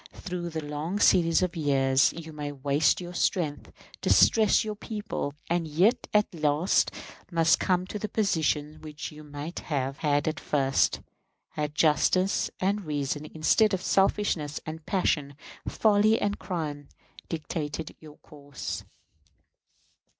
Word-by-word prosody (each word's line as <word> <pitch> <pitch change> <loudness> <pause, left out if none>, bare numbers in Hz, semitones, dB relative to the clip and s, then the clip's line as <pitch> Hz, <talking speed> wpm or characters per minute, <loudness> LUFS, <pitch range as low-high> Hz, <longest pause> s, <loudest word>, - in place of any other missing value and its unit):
Through 175 -2 -5
a 160 - -1
long 150 +5 -4
series 170 -3 +4
of 180 0 -2
years 135 -3 +3
you 160 -1 -9
may 145 -1 -5
waste 140 +1 +1
your 175 -1 -7
strength, 165 -4 -1 0.3
distress 220 -1 +4
your 215 - -3
people, 210 -9 -5
and 170 -1 0
yet 180 +10 +2
at 210 -2 +2
last 155 +2 +2 0.4
must 165 -2 +3
come 180 -1 +1
to 210 +2 -6
the 215 - -4
position 155 -7 0
which 155 +1 -7
you 155 0 -12
might 150 +3 -7
have 135 -3 -3
had 145 -1 +1
at 155 - -1
first, 135 -2 +1 0.5
had 150 0 -4
justice 185 +5 +2
and 200 +2 0
reason, 145 0 -2
instead 190 +7 +2
of 185 - -6
selfishness 190 -6 +1
and 155 0 -8
passion, 150 -7 0 0.3
folly 215 +1 +3
and 205 0 -1
crime, 150 -6 -4 0.4
dictated 155 -1 -4
your 155 -1 -14
course. 145 -3 -7
160 Hz, 135 wpm, -27 LUFS, 145-185 Hz, 0.5 s, series